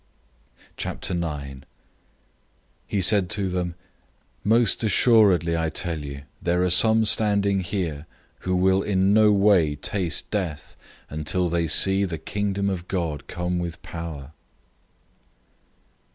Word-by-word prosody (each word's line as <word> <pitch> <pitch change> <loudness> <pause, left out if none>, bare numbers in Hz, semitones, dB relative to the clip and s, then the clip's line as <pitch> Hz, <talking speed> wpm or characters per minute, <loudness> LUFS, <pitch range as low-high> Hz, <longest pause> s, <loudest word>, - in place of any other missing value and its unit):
009:001 75 -6 -4 1.3
He 100 - -1
said 95 -1 +4
to 100 -2 +1
them, 90 -1 -3 0.7
"Most 115 0 +3
certainly 100 -7 +3
I 80 -1 -1
tell 85 -1 -3
you, 70 -1 -8 0.2
there 90 +1 0
are 90 - +1
some 110 +4 +6
standing 100 -2 +2
here 85 -5 -4 0.3
who 90 0 -2
will 95 +1 +2
in 95 0 +1
no 105 0 +5
way 100 -7 +3
taste 85 +3 -2
death 90 -8 -4 0.3
until 80 +4 -1
they 85 0 -1
see 95 +6 +4
the 85 -4 -3
Kingdom 100 +4 -3
of 90 -2 -4
God 85 -6 -4
come 90 0 -3
with 85 -1 -5
power." 80 -4 -8
90 Hz, 120 wpm, -23 LUFS, 80-100 Hz, 1.3 s, some